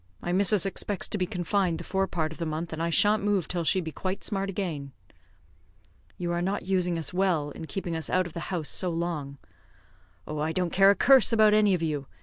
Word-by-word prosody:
My 175 - -4
missus 200 0 +3
expects 195 0 -2
to - - 0
be 180 - 0
confined 180 -2 0
the - - -7
fore 195 0 -1
part 155 -4 -2
of 160 - -10
the 165 - -2
month, 160 +2 -4
and 160 - -4
I 170 - 0
shan't 205 +5 +3
move 200 -4 +1
till 175 -2 -2
she 185 +4 +2
be 160 -2 -6
quite 185 +4 -4
smart 195 -1 -1
agin." 160 -8 -4 1.2
"You 175 -1 -3
are 175 0 -1
not 195 +3 -2
using 180 -2 0
us 165 +2 -2
well, 180 -6 +1
in 160 - -8
keeping 175 -2 -4
us 160 - -3
out 185 0 +2
of 175 - -8
the 170 - -5
house 170 -6 -1
so 185 - +1
long." 165 -5 -3 0.9
"Oh, 150 0 -5
I 155 +2 -1
don't 180 -1 -1
care 195 +1 +6
a 200 - +5
curse 265 +3 +5
about 215 -2 +5
any 210 -2 +4
of 170 - -3
you. 145 -4 -2
180 Hz, 230 wpm, -27 LUFS, 160-195 Hz, 1.2 s, care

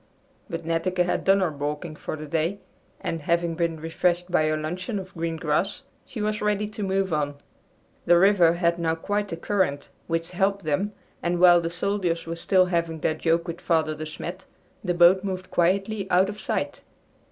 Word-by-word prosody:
But 165 -2 -5
Netteke 180 +2 +1
had 180 - -1
done 195 0 +4
her 180 -4 +1
balking 150 +2 -4
for - - -5
the 155 0 -7
day, 165 +5 -1 0.4
and, 165 - -3
having 170 +2 +1
been 165 -1 -1
refreshed 175 +2 0
by 155 -3 +3
her 155 0 +1
luncheon 180 +7 -3
of 190 -1 -7
green 165 -1 -2
grass, 175 - -1 0.2
she 220 -4 -5
was 210 0 -1
ready 210 0 +1
to 215 0 -7
move 190 -2 0
on. 145 -1 0 0.7
The 175 - +7
river 180 -3 +5
had 170 0 +1
now 165 -1 +1
quite 205 +4 -2
a 165 - -3
current, 170 -6 -1 0.2
which 165 0 -2
helped 195 +1 0
them, 190 +8 0 0.3
and 175 0 0
while 175 -1 +7
the 165 - -2
soldiers 175 -1 -1
were 165 0 -4
still 185 +2 +3
having 170 -3 -1
their 155 - +1
joke 165 +2 0
with 170 0 -5
Father 160 -2 +1
De 155 +1 -6
Smet 175 +4 -7 0.4
the 180 -3 0
boat 175 +2 +6
moved 185 -2 -4
quietly 195 +3 +1
out 185 +2 +4
of 210 0 -7
sight. - - -2
175 Hz, 190 wpm, -25 LUFS, 165-190 Hz, 0.7 s, The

